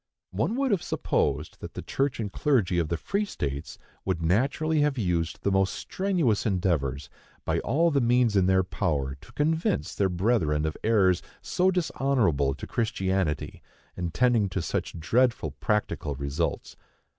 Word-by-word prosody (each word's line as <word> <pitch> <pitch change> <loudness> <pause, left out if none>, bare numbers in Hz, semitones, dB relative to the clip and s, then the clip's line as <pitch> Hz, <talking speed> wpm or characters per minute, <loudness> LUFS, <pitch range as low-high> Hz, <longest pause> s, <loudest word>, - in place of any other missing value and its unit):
One 230 - 0
would 270 -1 +1
have 195 -5 +2
supposed 75 +2 -1
that - - -8
the - - -5
church 135 -2 -1
and 105 -3 -3
clergy 115 - +2
of 80 - 0
the 85 - -1
free 200 - -1
states 70 - -4 0.3
would 95 -3 -1
naturally 135 - +1
have 145 -2 +1
used 85 -6 -1
the 100 - +1
most 95 0 +2
strenuous 175 - 0
endeavors, 80 - 0 0.4
by - - +1
all 165 +7 +2
the 140 -2 +2
means 120 -2 +3
in 95 -2 +4
their 95 0 +4
power, 75 -6 -1
to - - -15
convince 160 +6 0
their 100 -1 +1
brethren 85 -6 +1
of 80 - -2
errors 100 -5 +3 0.2
so 185 +1 +2
dishonorable 130 - +1
to - - -7
Christianity, 95 -7 -1 0.3
and 85 -1 -3
tending 115 +1 +2
to 95 0 -2
such 85 - -3
dreadful 120 +8 +1
practical 105 - -1
results. 70 +4 -3
95 Hz, 155 wpm, -27 LUFS, 85-135 Hz, 0.4 s, in